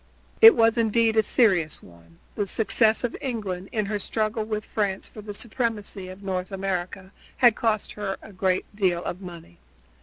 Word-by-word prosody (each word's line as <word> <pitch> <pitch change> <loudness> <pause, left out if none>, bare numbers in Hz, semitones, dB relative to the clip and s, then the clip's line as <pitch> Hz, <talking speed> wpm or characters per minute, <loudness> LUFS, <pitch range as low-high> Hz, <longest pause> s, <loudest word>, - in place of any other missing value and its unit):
It 450 0 +10
was 225 +1 +3
indeed 225 0 +2
a 220 - +5
serious 190 - +2
one. 85 -1 -18 0.2
The 205 -2 -2
success 220 +2 +2
of 245 - -2
England, 200 -8 -4
in 215 -3 -1
her 205 0 -2
struggle 215 +2 -1
with 215 -1 -4
France 200 -3 -2
for 215 - -11
the 205 0 -7
supremacy 210 -5 -3
of 185 +2 -11
North 185 0 -3
America 190 0 -4 0.3
had 240 -4 +5
cost 220 -2 -1
her 200 -2 -4
a 215 - -14
great 185 0 0
deal 180 -4 0
of 180 - -5
money. 170 - -11
205 Hz, 175 wpm, -25 LUFS, 185-220 Hz, 0.3 s, It